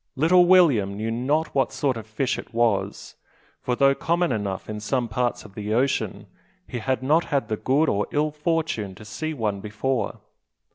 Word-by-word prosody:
Little 175 +6 +5
William 135 - +4
knew 110 +2 -2
not 145 +7 0
what 135 -1 +1
sort 135 -1 0
of 110 -2 -8
fish 120 +5 -1
it - - -11
was; 115 -4 0 0.4
for 125 - -1
though 135 +1 +4
common 170 +4 0
enough 100 -4 -3
in 105 0 -5
some 120 +3 -1
parts 120 +1 -1
of 100 - -13
the 105 +1 -3
ocean, 130 +3 0 0.4
he 120 - -4
had 130 +2 -1
not 155 +5 +3
had 140 -4 -1
the 110 - -1
good 145 +8 +2
or 100 +1 0
ill 150 +1 0
fortune 150 - -2
to 105 - -12
see 155 +9 -4
one 105 -6 -1
before. 110 +3 -2
125 Hz, 185 wpm, -24 LUFS, 110-150 Hz, 0.4 s, Little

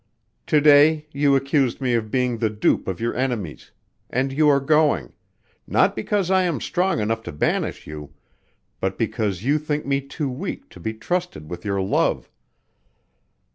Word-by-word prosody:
To 150 - +4
day 150 +1 +5
you 140 -1 +3
accused 135 -2 +1
me 130 -3 0
of 110 -2 0
being 125 -1 0
the 110 - +1
dupe 105 0 0
of 95 -2 -3
your 115 +1 -1
enemies 120 - -3 0.4
and 135 +2 -1
you 150 +1 +4
are 140 -1 +4
going 150 +2 +2 0.5
not - - +3
because 190 - -1
I 190 0 +4
am 175 -5 0
strong 185 -4 0
enough 110 +1 -1
to - - -7
banish 75 - -1
you, 75 -1 -8 0.7
but 95 0 -2
because 105 -4 -2
you 145 +4 +2
think 150 0 -3
me 140 0 0
too 140 +2 -4
weak 195 - -6
to - - -14
be 110 0 -4
trusted 170 - -3
with 90 0 -6
your 100 -2 -1
love. 95 - 0
135 Hz, 170 wpm, -22 LUFS, 110-150 Hz, 0.7 s, day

